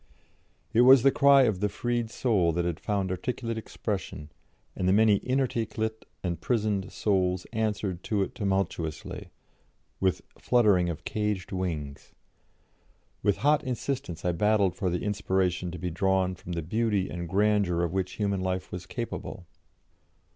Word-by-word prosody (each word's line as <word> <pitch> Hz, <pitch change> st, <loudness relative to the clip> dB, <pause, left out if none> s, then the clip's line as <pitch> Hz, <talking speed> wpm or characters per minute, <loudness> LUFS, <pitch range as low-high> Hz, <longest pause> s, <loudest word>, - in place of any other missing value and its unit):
It 115 Hz, -, +5 dB
was 130 Hz, 0 st, +8 dB
the 135 Hz, -, +6 dB
cry 140 Hz, -1 st, +6 dB
of 110 Hz, -7 st, +1 dB
the 105 Hz, +1 st, +1 dB
freed 120 Hz, +2 st, -2 dB
soul 105 Hz, -8 st, +1 dB
that 85 Hz, +1 st, 0 dB
had 85 Hz, -2 st, -2 dB
found 100 Hz, -3 st, -1 dB
articulate 115 Hz, +4 st, -3 dB
expression, 95 Hz, -9 st, -5 dB, 0.4 s
and 90 Hz, -, -1 dB
the -, -, +4 dB
many 105 Hz, -1 st, +5 dB
inarticulate 115 Hz, -4 st, -1 dB, 0.2 s
and 85 Hz, -2 st, -3 dB
prisoned 105 Hz, -5 st, 0 dB
souls 95 Hz, -3 st, 0 dB
answered 105 Hz, -5 st, -2 dB
to 105 Hz, -3 st, +1 dB
it -, -, -6 dB
tumultously, 95 Hz, -6 st, -2 dB, 0.7 s
with 95 Hz, -1 st, +1 dB, 0.2 s
fluttering 105 Hz, -8 st, +3 dB
of 80 Hz, -, -5 dB
caged 105 Hz, -3 st, -2 dB
wings. 80 Hz, -7 st, -4 dB, 1.1 s
With 100 Hz, 0 st, +2 dB
hot 150 Hz, 0 st, +4 dB
insistence 125 Hz, -, -4 dB
I 90 Hz, -, +3 dB
battled 100 Hz, +1 st, +2 dB
for 95 Hz, -5 st, -1 dB
the 90 Hz, 0 st, -2 dB
inspiration 95 Hz, -3 st, 0 dB
to 90 Hz, -, -6 dB
be 90 Hz, +2 st, -3 dB
drawn 95 Hz, +1 st, +1 dB
from 90 Hz, 0 st, -8 dB
the 85 Hz, -1 st, -3 dB
beauty 105 Hz, +2 st, 0 dB
and 85 Hz, -1 st, -5 dB
grandeur 100 Hz, -3 st, +2 dB
of 85 Hz, 0 st, -2 dB
which 95 Hz, -1 st, -1 dB
human 100 Hz, -2 st, -1 dB
life 95 Hz, 0 st, -2 dB
was 90 Hz, 0 st, -6 dB
capable. 115 Hz, -4 st, -6 dB
100 Hz, 150 wpm, -28 LUFS, 90-110 Hz, 1.1 s, was